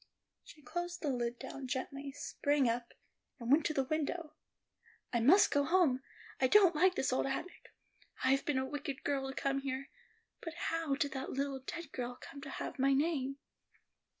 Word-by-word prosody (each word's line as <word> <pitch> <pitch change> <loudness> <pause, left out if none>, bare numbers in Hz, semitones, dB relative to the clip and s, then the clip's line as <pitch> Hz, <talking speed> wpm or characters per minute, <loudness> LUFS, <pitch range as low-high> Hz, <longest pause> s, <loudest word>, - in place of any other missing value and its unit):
She 300 - -15
closed 350 +6 -4
the 295 - +1
lid 240 -1 -1
down 270 +2 -7
gently, 275 +2 -3
sprang 290 -1 +1
up, 235 +1 -1 0.5
and 235 +1 -2
went 300 +2 +5
to 310 - -2
the 270 - +3
window. 310 +3 -2 0.8
"I 235 - +3
must 315 - +6
go 285 - +3
home; 315 -6 +3 0.4
I 260 - +4
don't 375 +3 +7
like 365 +4 +4
this 265 - +1
old 260 - +1
attic. 290 +7 -5 0.5
I've 270 +1 +3
been 295 -3 0
a 260 - +1
wicked 285 -1 -5
girl 270 -2 0
to 270 - -6
come 275 0 0
here. 270 0 -4 0.5
But 330 0 -6
how 330 -4 -1
did 285 -1 0
that 265 0 -4
little 275 0 -1
dead 335 +3 -7
girl 245 -1 -4
come 280 - -10
to - - -7
have - - -5
my 275 +1 +4
name?" 275 -2 0
275 Hz, 180 wpm, -34 LUFS, 265-310 Hz, 0.8 s, don't